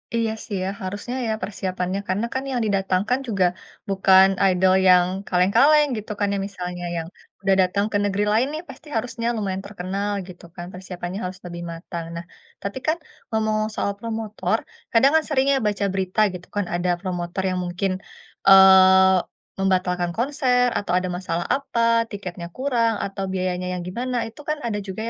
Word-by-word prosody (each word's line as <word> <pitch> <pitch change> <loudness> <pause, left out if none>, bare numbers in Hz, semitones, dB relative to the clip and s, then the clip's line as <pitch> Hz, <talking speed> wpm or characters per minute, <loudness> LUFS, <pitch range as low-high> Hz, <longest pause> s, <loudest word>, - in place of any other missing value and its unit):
Iya 230 -1 +1
sih 205 -4 -4
ya, 190 - -1
harusnya 205 +6 -5
ya - - 0
persiapannya, 185 -1 -3
karena 195 +5 0
kan 260 - -2
yang 250 - 0
didatangkan 195 +4 +1
juga 195 -5 +2 0.4
bukan 190 0 +6 0.2
idol 185 +1 +3
yang 180 -1 +7 0.2
kaleng-kaleng 245 +12 +4
gitu 215 0 -6
kan 205 - +2
ya, - - 0
misalnya 180 -2 -6
yang 165 0 -4 0.3
sudah 195 0 +2
datang 200 +3 +1
ke 205 - +2
negeri 205 0 0
lain 240 +5 +3
nih 310 - -4
pasti 310 - -12
harusnya 235 0 -2
lumayan 195 -2 -2
terkenal 200 +1 -3 0.2
gitu 175 -2 -12
kan, 175 - -6
persiapannya 180 0 -6
harus 185 +1 -6
lebih 170 0 -6
matang. 165 0 -6
Nah, 170 +1 -6 0.4
tapi 200 +5 -4
kan 320 +2 +2 0.3
ngomong-omong 215 -1 0
soal 200 - 0
promotor, 220 -2 -2 0.4
kadang 265 +5 +5
kan 320 - +4
sering 270 -3 +2
ya 270 - +3
baca 205 -1 0
berita 190 +1 -2
gitu 180 0 -9
kan, 205 -1 0
ada 175 +1 0
promotor 180 -1 -3
yang 185 0 -1
mungkin, 180 +2 -1 0.6
eee, 190 0 +8 0.4
membatalkan 180 -2 0
konser 250 -1 +2
atau 180 -3 -1
ada 185 0 0
masalah 175 -1 -2
apa, 230 -4 +2
tiketnya 180 -4 -7
kurang, 235 -4 +1
atau 195 0 -4
biayanya 185 -1 -2
yang 180 - -4
gimana, 240 +6 -2
itu 225 +3 -9
kan 305 - +1
ada 220 -3 -2
juga 200 +1 -6
195 Hz, 170 wpm, -23 LUFS, 185-225 Hz, 0.6 s, eee